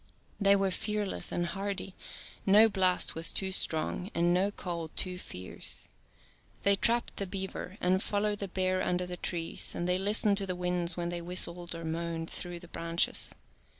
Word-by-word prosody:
They 200 -1 +5
were 195 -1 +1
fearless 210 +1 -2
and 175 - -1
hardy; 195 +1 -4 0.5
no 210 +3 +7
blast 185 -3 +2
was 165 +1 +2
too 190 -1 -1
strong 180 +1 0
and 175 +1 +3
no 190 +3 +3
cold 170 -5 -5
too 180 -1 -1
fierce. 95 - -3 0.7
8i - - -25
They 200 0 +5
trapped 235 +4 0
the 200 - -2
beaver, 190 0 -5
and 185 +1 +2
followed 205 0 0
the 200 - -3
bear 185 0 0
under 180 0 0
the 180 0 -4
trees, 170 -2 -2
and 175 - -2
they 180 +1 +1
listened 205 +1 +3
to 195 - -3
the 185 - -2
winds 180 -1 +2
when 170 0 -2
they 175 0 -3
whistled 175 0 0
or 165 0 -7
moaned 165 0 -3
through 175 -1 -1
the 175 - -12
branches. 165 0 +1
180 Hz, 180 wpm, -30 LUFS, 175-195 Hz, 0.7 s, no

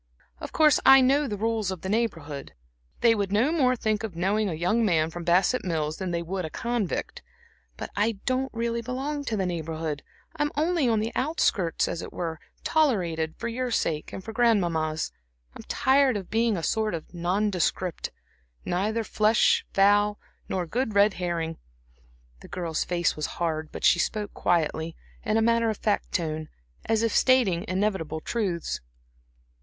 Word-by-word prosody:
"Of - - -7
course 305 -3 +5
I 270 0 +9
know 275 +3 +3
the 210 -4 -3
rules 220 -1 0
of 190 -3 -5
the - - -5
Neighborhood. 160 - -2 0.5
They 230 -1 +6
would 200 -3 -1
no 230 +9 +3
more 260 -6 +3
think 215 -2 -1
of 210 -6 -5
knowing 200 +4 +1
a 165 - -3
young 180 +8 +1
man 165 -6 +2
from 175 +1 -6
Bassett 185 +9 +3
Mills 155 -3 -2
than 190 -2 -3
they 170 -1 -2
would 185 +2 -3
a 160 - -4
convict. 230 0 -3 0.6
But - - -6
I 210 +3 +2
don't 260 +1 0
really 235 0 -2
belong 275 +5 -3
to 225 -5 -1
the 190 - 0
Neighborhood; 160 -3 -3 0.3
I'm 295 -1 0
only 315 -4 +2
on 220 -2 +2
the 225 +2 -2
outskirts, 230 - +1
as 165 - -3
it - - -7
were 165 -3 -4 0.2
tolerated 175 - +1
for 235 - -4
your 250 +2 -2
sake 160 -9 -1
and 190 - -7
for 220 - -7
Grandmamma's. 170 -10 +1 0.4
I'm - - -8
tired 265 -3 +3
of 190 -3 -8
being 225 -2 +2
a 165 - -4
sort 215 -1 0
of 165 +2 -9
nondescript 180 0 -1 0.6
neither 215 +6 0
flesh, 215 +1 +3
fowl, 205 +1 +4 0.3
nor 185 -2 -1
good 220 +4 -2
red 200 0 +5
herring." 170 -3 -3 0.8
The - - -13
girl's 170 -3 -2
face 175 -1 0
was 150 - -2
hard, 160 -2 -2
but - - -8
she 175 - +5
spoke 210 +3 -2
quietly, 160 -1 0 0.3
in 215 -1 +1
a 225 - +3
matter 230 0 +3
of 215 - -2
fact 210 -2 -1
tone, 155 -3 -2 0.4
as 225 0 +2
if 230 - 0
stating 215 -9 +3
inevitable 185 -5 -1
truths. 185 -3 -2
205 Hz, 170 wpm, -26 LUFS, 170-230 Hz, 0.8 s, I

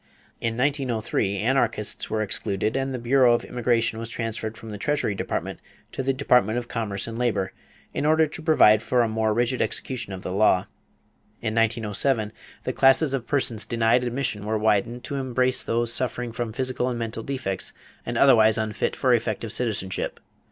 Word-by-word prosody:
In 115 0 -2
1903, 125 -7 0
anarchists 115 -1 0
were 110 0 0
excluded 105 +1 -1
and 135 0 -1
the 130 - -3
bureau 125 0 +4
of 120 - -3
immigration 115 -2 0
was 115 0 -5
transferred 115 -1 -4
from 110 - -9
the 105 - -7
Treasury 145 -5 0
Department 100 - -4 0.3
to - - -3
the 135 +1 +1
Department 125 -5 +2
of 120 -1 -3
Commerce 105 -5 -3
and 115 0 -6
Labor, 105 -6 0 0.4
in - - -2
order 155 +1 +4
to 155 +2 -7
provide 130 -10 +5
for 125 +1 +2
a - - +1
more 110 0 0
rigid 120 +3 0
execution 115 0 -2
of 95 -1 -7
the 90 - -4
law. 95 -2 +4 0.8
In 110 -1 -1
1907 110 0 0 0.3
the - - -2
classes 135 +2 +4
of 125 -4 -3
persons 120 -6 +1
denied 115 +1 +2
admission 120 -4 -2
were 110 +1 -1
widened 110 +3 +1
to 140 - -4
embrace 130 -1 +1
those 115 0 0
suffering 125 -1 0
from 115 0 -4
physical 130 +1 -1
and 120 - -3
mental 115 -1 -4
defects 120 -7 -3 0.3
and 120 0 -3
otherwise 115 -5 +5
unfit 110 -1 -1
for 130 -2 +2
effective 110 -1 -1
citizenship. 105 -6 -2
115 Hz, 175 wpm, -24 LUFS, 110-130 Hz, 0.8 s, provide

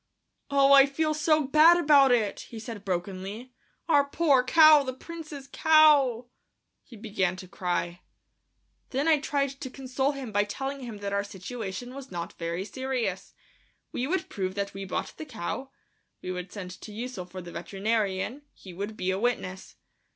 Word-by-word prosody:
"Oh, 280 0 +5
I 275 0 +8
feel 310 +3 0
so 305 0 +2
bad 310 +5 +6
about 290 -5 +5
it," 225 -4 +1
he 230 - -9
said 220 -2 -7
brokenly; 195 +6 -4 0.3
"our 290 -4 +5
poor 280 -2 +2
cow, 310 +2 +7
the 260 -2 -4
Prince's 310 -2 -9
cow!" 295 -7 +4 0.6
He 240 - -14
began 200 -4 -1
to 185 0 -10
cry. 175 0 -3 0.9
Then 275 +4 -1
I 315 -2 +5
tried 280 -1 0
to 260 - -5
console 265 +2 -2
him 265 -5 -7
by 205 0 +2
telling 270 +7 -5
him 235 -5 -7
that 200 0 -3
our 200 0 +1
situation 205 +4 -7
was 270 -1 -9
not 170 -1 -5
very 170 +3 -3
serious. 260 +2 -3 0.6
We 250 - -2
would 375 +5 -1
prove 190 -2 -4
that 200 0 -3
we 195 0 -6
bought 185 - -4
the - - -6
cow; 260 - -5 0.5
we 185 - -3
would 180 0 -6
send 185 -3 -7
to 215 - -9
Ussel 225 -3 -6
for 185 +1 -8
the 175 -1 -9
veterinarian... 200 +6 -2
he 185 - -12
would 205 +4 -5
be 185 +1 -1
a 190 - -2
witness. 195 -5 -2
240 Hz, 170 wpm, -27 LUFS, 195-275 Hz, 0.9 s, I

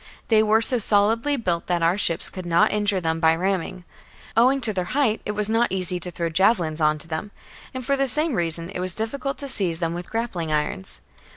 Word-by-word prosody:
They 220 -2 +5
were 220 +1 +3
so 250 0 +3
solidly 225 +7 +2
built 175 -8 -2
that 175 -1 0
our 170 +2 +3
ships 175 -5 0
could 185 - -7
not 170 0 +3
injure 205 -2 +1
them 165 -2 -1
by 160 0 +4
ramming; 185 0 -2 0.5
owing 255 +4 +4
to 225 -3 +1
their 185 -2 -2
height, 235 -7 +2
it 210 - -2
was 210 0 +1
not 225 +2 +1
easy 185 -1 -1
to 180 - -4
throw 170 -1 -3
javelins 170 -2 +1
on 155 0 +3
to 150 - -8
them; 165 +5 -4 0.4
and 260 -1 -6
for 280 - +2
the 275 0 0
same 300 +3 0
reason 170 -2 -1
it 185 - -5
was 180 -1 0
difficult 275 +5 -3
to 280 - -6
seize 190 -10 -1
them 165 -1 -2
with 175 +1 -7
grappling 205 -9 -3
irons. 150 -11 -3
190 Hz, 220 wpm, -23 LUFS, 170-225 Hz, 0.5 s, They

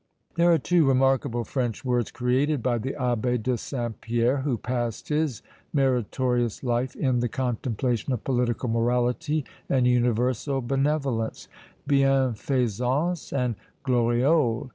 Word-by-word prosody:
There 170 +1 +4
are 165 - +5
two 165 +1 +2
remarkable 135 -2 +2
French 125 0 -3
words 125 -3 +1
created 130 +2 0
by 120 -2 +1
the 130 +4 -3
Abbé 125 -3 -1
de 125 +2 +1
Saint 120 -2 -5
Pierre, 120 +3 +1
who 135 -3 -1
passed 120 -2 -3
his 150 -5 -1 0.3
meritorious 125 -3 0
life 125 +1 -1
in 130 -3 +1
the 120 0 0
contemplation 125 0 -2
of 125 -4 -2
political 125 -1 0
morality 125 +5 0 0.2
and 130 -2 +2
universal 125 +2 +1
benevolence 135 -2 -1 0.4
bienfaisance 135 - +1
and 125 -3 0 0.3
gloriole. 125 +1 +2
125 Hz, 120 wpm, -26 LUFS, 120-135 Hz, 0.4 s, are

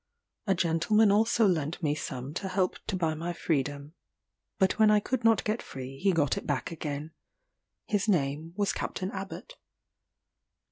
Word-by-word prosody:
A 195 - +3
gentleman 185 +5 +3
also 225 +2 +3
lent 165 -2 0
me 145 -2 +2
some 135 -2 -5
to 190 - -3
help 185 0 0
to - - -1
buy 165 -3 0
my 170 +3 -3
freedom 145 -2 -2 0.6
but 190 +2 +2
when 215 -1 +6
I 210 0 +5
could 245 +3 -2
not 225 -1 +4
get 215 +2 -1
free 135 +1 -8
he 195 0 +3
got 150 -6 +1
it - - -5
back 145 +1 -1
again. 150 -1 -5 0.7
His 205 -3 0
name 155 -2 0
was 205 -1 +1
Captain 190 +1 -3
Abbot. 195 - -7
175 Hz, 160 wpm, -29 LUFS, 150-205 Hz, 0.7 s, when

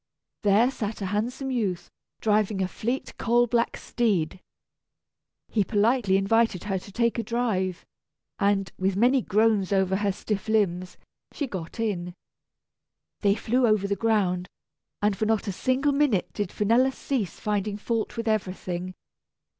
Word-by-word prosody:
There 215 +5 +4
sat 215 -4 -4
a 190 +1 -3
handsome 250 +6 -2
youth, 205 -8 -2 0.3
driving 210 -2 +2
a - - 0
fleet 240 +7 -3
coal 240 +1 +3
black 235 0 0
steed. 190 -8 0 1.1
He 210 - +1
politely 210 -1 +2
invited 215 -1 +2
her 195 -2 -1
to 200 - -13
take 235 +2 +1
a - - -1
drive, 205 -6 -1 0.5
and, 200 -2 +1
with 190 0 +1
many 250 +6 +4
groans 210 -2 +2
over 190 -1 +2
her 205 0 +1
stiff 205 +2 -4
limbs, 185 -4 0 0.3
she 290 - -3
got 185 -6 -7
in. 180 -6 -2 1.0
They 200 -1 +3
flew 245 +3 +1
over 215 -2 +2
the 200 - 0
ground, 195 -5 +1 0.5
and 205 -1 +3
for 215 +3 -1
not 220 -1 +1
a - - 0
single 260 +8 +1
minute 280 -9 +1
did 205 -3 -2
Finella 235 +6 +3
cease 250 - -3
finding 210 -1 -1
fault 230 +2 -2
with 230 0 -3
everything. 185 -3 -2
210 Hz, 145 wpm, -26 LUFS, 190-230 Hz, 1.1 s, There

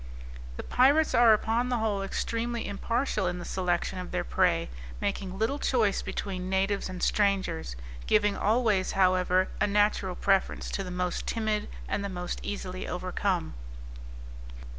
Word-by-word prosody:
The - - -5
pirates 285 +5 +4
are 235 -1 +7
upon 225 +3 +2
the 245 - +1
whole 215 -3 0
extremely 230 +4 -2
impartial 215 0 -1
in 180 0 -2
the 175 - -7
selection 180 0 -1
of 180 - -6
their 90 - -1
prey, - - +1 0.3
making 190 - -3
little 225 +7 0
choice 220 -9 +2
between 185 -2 -4
natives 195 +1 0
and 185 -1 -6
strangers, 190 - +1 0.3
giving 210 -1 +3
always, 215 -3 +2
however, 185 -1 +3
a - - +4
natural 205 -2 +1
preference 195 0 +1
to 195 - -2
the 185 - -6
most 180 0 -2
timid, 215 -2 -1 0.2
and 200 - -2
the 200 - -3
most 180 -1 -4
easily 185 -2 -5
overcome. 180 -1 -2
195 Hz, 145 wpm, -28 LUFS, 185-220 Hz, 0.3 s, are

